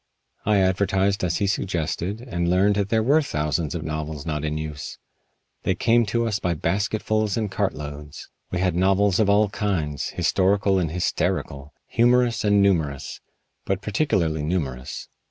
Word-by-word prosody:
I 105 -1 +4
advertised 95 +1 +1
as 85 -2 +1
he 100 - 0
suggested 95 +1 -2
and 85 -9 -2
learned 95 +3 +3
that 100 -1 0
there 110 -1 +2
were 145 +7 +4
thousands 75 - -2
of 80 - -4
novels 75 -2 -4
not 75 -2 -2
in 75 0 -2
use. 75 -1 -6 0.6
They 95 - 0
came 115 +4 +3
to 115 +3 0
us 105 -3 -1
by 85 -1 -1
basketfuls 105 +5 0
and 110 -3 -2
cartloads. 75 -7 -4 0.2
We 90 - -2
had 90 -3 +1
novels 95 +2 +3
of 105 -2 +3
all 105 0 +4
kinds 85 -9 -2
historical 95 0 +2
and 85 -4 0
hysterical, 75 -4 -2
humorous 120 0 +2
and 105 -1 +4
numerous, 80 -8 0 0.4
but 95 +1 -2
particularly 95 - 0
numerous. 70 -6 -3
95 Hz, 155 wpm, -24 LUFS, 80-105 Hz, 0.6 s, I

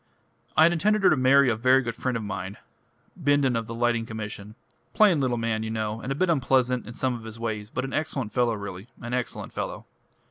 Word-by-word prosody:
"I 155 - +8
had 170 +1 +5
intended 205 +5 +1
her - - +6
to - - +5
marry 135 +1 +5
a 120 - +2
very 130 +4 +4
good 115 -2 -4
friend 125 -1 -1
of 115 - -5
mine 95 -1 -5 0.6
Bindon 145 -6 +2
of 115 -1 -2
the 115 - -6
Lighting 120 -1 +1
Commission 105 -1 -7 0.4
plain 200 -8 +5
little 125 -3 0
man, 115 -1 -1
you 110 - -3
know, 110 0 -3
and 130 - -4
a - - 0
bit 185 +6 +1
unpleasant 125 -5 +1
in 115 - -8
some 130 -1 0
of 120 -2 -7
his 110 0 -8
ways, 110 -2 -3
but 130 +3 -3
an 135 - -6
excellent 135 -8 -2
fellow 120 -2 +2
really 100 0 -7
an 120 +1 -6
excellent 125 -1 -3
fellow." - - -5
120 Hz, 225 wpm, -26 LUFS, 110-135 Hz, 0.6 s, I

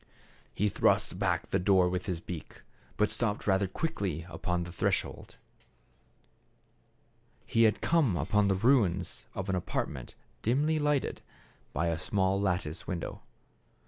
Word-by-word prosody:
He 105 - +2
thrust 100 - +2
back - - 0
the 95 - +2
door 95 -1 +4
with 90 +1 -2
his 90 -3 -1
beak, 85 -1 -8 0.3
but 105 - +2
stopped 105 -3 -1
rather 95 -1 +3
quickly 95 - -2
upon 90 -2 -2
the 85 - -7
threshold. 85 - -2 2.1
He 115 0 +4
had 110 - +2
come 150 - +3
upon 100 +7 +2
the 95 - +3
ruins 95 -5 +2
of 95 - -3
an 95 - 0
apartment 70 -7 -3 0.3
dimly 150 +7 +2
lighted 145 -2 0 0.5
by 80 +5 0
a 85 -1 0
small 95 +1 +1
lattice 90 -4 -1
window. 90 -2 -4
95 Hz, 135 wpm, -30 LUFS, 90-105 Hz, 2.1 s, door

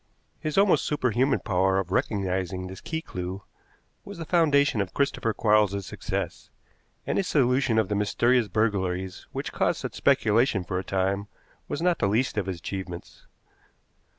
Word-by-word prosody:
His 155 +2 -3
almost 200 -1 +4
superhuman 130 -2 +1
power 95 -1 +1
of 95 -2 -2
recognizing 95 -2 -1
this 95 0 -9
key 160 0 -4
clew 90 - -6 0.6
was 200 -2 -9
the 165 - -5
foundation 145 - +3
of 95 - -5
Christopher 140 -4 0
Quarles's 105 -3 +2
success, - - -4 0.6
and - - 0
his 190 - -1
solution 125 -3 +2
of 110 -3 +3
the 105 - -2
mysterious 115 +4 +2
burglaries 95 -3 -1
which - - -4
caused - - +1
such - - -5
speculation 110 -2 +2
for 90 +1 -2
a - - -4
time 95 +2 -1 0.4
was 165 - -3
not 175 -2 +2
the - - +2
least 115 +6 +1
of 100 -3 -1
his 95 -2 -3
achievements. 90 0 -7
105 Hz, 155 wpm, -26 LUFS, 95-130 Hz, 0.6 s, almost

